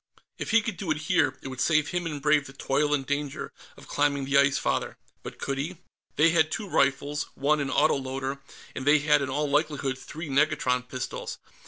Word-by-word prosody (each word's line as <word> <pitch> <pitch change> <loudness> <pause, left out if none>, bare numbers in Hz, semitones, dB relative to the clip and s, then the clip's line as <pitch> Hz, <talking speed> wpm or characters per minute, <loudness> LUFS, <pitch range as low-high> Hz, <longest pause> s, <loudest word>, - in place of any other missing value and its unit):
If - - -4
he 225 -1 +4
could 210 -4 -4
do 175 -1 -5
it 155 - +1
here, 160 -6 +2
it - - -5
would 130 -1 -5
save 155 -2 +3
him 175 -1 -2
and 150 -3 -4
Brave 150 -1 +3
the 135 - -12
toil 140 +2 0
and 140 -2 +1
danger 145 0 -3 0.2
of - - -14
climbing 140 -1 +1
the 140 +1 -1
Ice 140 -1 +4
Father. - - -1 0.2
But - - -8
could 135 0 -3
he? 160 +6 -4 0.4
They 160 +2 +5
had 160 -2 +3
two 210 +5 -4
rifles, 140 -2 +1
one 150 +2 +2
an 140 -2 -1
autoloader, 135 -2 0 0.3
and 130 - -5
they 150 +1 +7
had 150 0 +3
in 140 - -2
all 150 +3 0
likelihood 145 -2 0
three 160 +4 -8
negatron 135 -3 +1
pistols. 130 -1 -5
145 Hz, 205 wpm, -27 LUFS, 135-155 Hz, 0.4 s, they